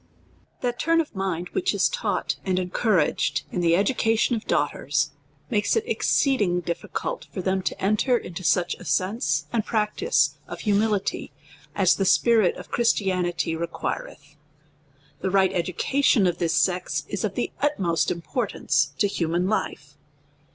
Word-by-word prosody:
THAT 245 -1 -2
turn 330 +1 +3
of 320 - -2
mind, 185 -3 -3
which 380 0 0
is - - +3
taug - - -2
ht - - +1
and 185 -1 0
encou 185 +4 +1
raged 150 - +1
in 180 - -2
the 170 -1 +4
education 225 +3 +2
of 220 - -6
daughters, 145 0 0 0.4
makes 205 -2 +1
it 450 - +1
exceed 275 - +1
ing 180 -3 +1
difficult 175 - -4
for 185 - -5
them 190 0 0
to - - -3
enter 215 +6 +2
into 180 -3 -7
such 175 +1 +2
a - - -10
sense 185 - 0
and 225 - +1
practice 220 - +1
of - - -7
humihty, 210 -1 0 0.5
as 190 -3 +3
the 195 - 0
spirit 220 -1 +4
of - - -11
Christianity 185 -7 +1
re 170 +1 -2
quireth. 150 -2 -6 0.8
The 190 - -1
right 190 0 +3
education 195 +6 +2
of 175 -1 0
this 165 -2 +1
sex 180 +1 0
is - - -4
of - - -2
the - - -2
utmost 190 - +1
im 170 -1 -3
portance 145 - -1
to - - +2
human 175 -1 -1
life. 215 - -3
190 Hz, 160 wpm, -24 LUFS, 175-225 Hz, 0.8 s, the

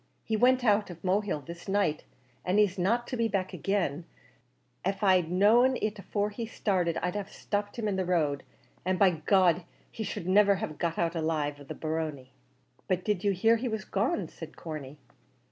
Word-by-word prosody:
He 220 - -1
went 250 +3 +4
away 225 - +5
out 205 0 +1
of 170 -2 -10
Mohill 190 -5 0
this 170 +3 -9
night, 195 -6 0 0.4
an' 185 +3 +1
he's 200 -3 +3
not 230 +7 +1
to 250 - -4
be 230 -1 +1
back 190 -4 -2
agin; 175 -6 -1 0.8
av 195 +2 -2
I'd 185 -4 +4
known 230 +8 +4
it 215 -1 -2
afore 205 +2 -2
he 230 +2 -5
started 180 -7 0
I'd 180 0 0
have 205 -2 -4
stopped 205 +1 -3
him 225 -2 -1
in 195 -2 0
the 190 - 0
road, 155 -6 +1 0.4
an' 185 +1 0
by 190 -1 +5
G 160 -2 -8 0.4
d 175 - -17 0.3
he 220 - -5
should 180 - -5
niver 200 +1 +5
have 180 -7 -5
got 170 0 0
alive 155 -3 -1
out - - -18
of 140 - -13
the - - -6
barony." 155 -5 -4 0.6
"But 185 0 0
did 210 -3 0
you 200 - +3
hear 225 +5 +3
he 250 +3 -3
was 220 -4 -3
gone?" 200 -3 0
said 160 0 -11
Corney. 150 -3 -7
190 Hz, 200 wpm, -29 LUFS, 165-210 Hz, 0.8 s, away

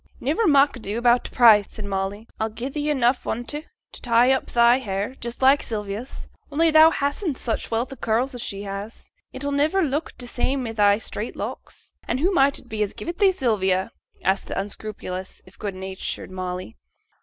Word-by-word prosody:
'Niver 320 - +1
mak' 285 -2 +5
ado 215 -2 -4
about 240 +1 +3
t' - - -5
price,' 220 -5 +6
said 215 - -8
Molly; 200 +2 -3
'I'll 220 - 0
gi'e 235 +4 -5
thee 295 +1 -2
enough 250 -3 +1
on 235 +2 -2
't 300 +5 -6 0.2
to - - -12
tie 240 +1 +4
up 265 - +1
thy 235 +1 +4
hair, 205 0 -3
just 235 +2 -5
like 275 +2 +6
Sylvia's. 210 +3 -5 0.2
Only 325 +3 +3
thou 315 +1 +8
hastn't 290 0 -1
such 230 - -3
wealth 235 +4 -1
o' - - -12
curls 235 +4 0
as 245 - -6
she 200 -2 -5
has; 200 +2 -7 0.2
it'll 285 +2 -4
niver 305 +7 +2
look 295 +1 -2
t' 250 - -6
same 255 +2 -1
i' 225 - -3
thy 205 -2 +4
straight 225 - -5
locks. - - -7
And 255 - -1
who 355 +7 +2
might 275 -4 +3
it - - -13
be 220 -2 -4
as 205 - -1
give - - -6
it 345 - -5
thee, 395 -2 +6
Sylvia?' 190 - 0 0.3
asked 190 +1 +1
the - - -3
unscrupulous, 195 -2 -6
if 185 - -18
good 200 -3 -4
natured 190 0 -5
Molly. 185 +3 -5
235 Hz, 200 wpm, -23 LUFS, 205-275 Hz, 0.3 s, thou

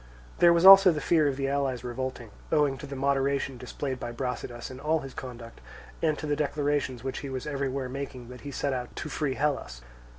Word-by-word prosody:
There 175 - +7
was 170 +1 +3
also 195 -1 +10
the 155 - -2
fear 155 +1 +3
of 135 -2 -1
the 135 -1 -1
allies 135 -3 -1
revolting, 125 -2 -5 0.2
owing 150 -3 +3
to 145 - -8
the 140 - -6
moderation 135 -1 0
displayed 130 +1 -4
by 120 - -5
Brasidas 125 0 -5
in 130 - -9
all 155 +2 +1
his 135 -1 -9
conduct, 120 - -9 0.4
and 155 -2 +1
to - - -5
the 150 -1 0
declarations 145 -4 -1
which 135 0 -3
he 140 - -6
was 130 +1 -5
everywhere 140 -2 -2
making 130 -2 -6
that 125 0 -10
he 145 - -7
sent 140 0 -2
out 125 -1 -5
to 155 - -5
free 145 -3 -2
Hellas. 135 - -2
135 Hz, 210 wpm, -28 LUFS, 125-145 Hz, 0.4 s, also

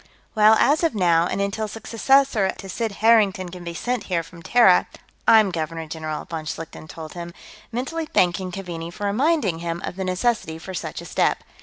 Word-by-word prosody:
"Well, 215 0 +6
as 295 +8 +3
of 325 -8 +1
now, 170 -3 +3
and - - -3
until 200 +2 -1
a - - -7
successor 230 0 +2
to 195 - -9
Sid 225 +4 -3
Harrington 200 -5 +4
can 180 0 -9
be 170 -1 -6
sent 245 +6 -2
here 170 -3 -1
from 170 +1 -14
Terra, 210 -1 +5 0.4
I'm 215 -3 +6
Governor 165 -1 -4
General," 155 -1 -5
von 160 -2 -6
Schlichten 155 0 -7
told 160 -1 -9
him, 170 -1 -8 0.4
mentally 310 +7 -3
thanking 185 - +1
Keaveney 170 -3 -6
for 205 +4 -6
reminding 220 - +1
him 170 0 -3
of 180 - -6
the 190 - -2
necessity 185 -3 -1
for 185 +3 -8
such 180 - -5
a - - -10
step. - - 0
190 Hz, 190 wpm, -23 LUFS, 170-225 Hz, 0.4 s, Well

